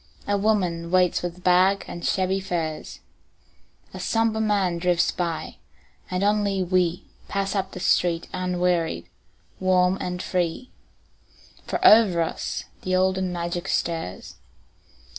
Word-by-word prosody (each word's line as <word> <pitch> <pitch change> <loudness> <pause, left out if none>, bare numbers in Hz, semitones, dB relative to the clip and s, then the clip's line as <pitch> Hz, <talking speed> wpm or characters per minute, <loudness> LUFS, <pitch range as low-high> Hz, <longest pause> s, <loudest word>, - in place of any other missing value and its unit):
A 205 - +2
woman 185 -5 0
waits 180 0 +3
with 175 0 -6
bag 185 +2 +3
and 175 - -7
shabby 190 0 +1
furs, 170 -5 -4 0.9
A - - -7
somber 225 -1 +1
man 195 -5 +1
drifts 175 0 +2
by, 170 -3 -4 0.5
and 185 +1 -1
only 205 -2 +1
we 180 0 0 0.2
Pass 195 -1 -2
up 195 -2 -2
the - - -6
street 170 -1 +1
unwearied, 180 - -1 0.5
warm 185 0 +2
and 180 0 -3
free, 180 +7 -2 1.0
For - - -1
over 205 -6 +7
us 160 - -4 0.2
the 185 0 -1
olden 185 0 +1
magic 175 +1 -3
stirs. 165 - -3
180 Hz, 125 wpm, -24 LUFS, 175-195 Hz, 1.0 s, over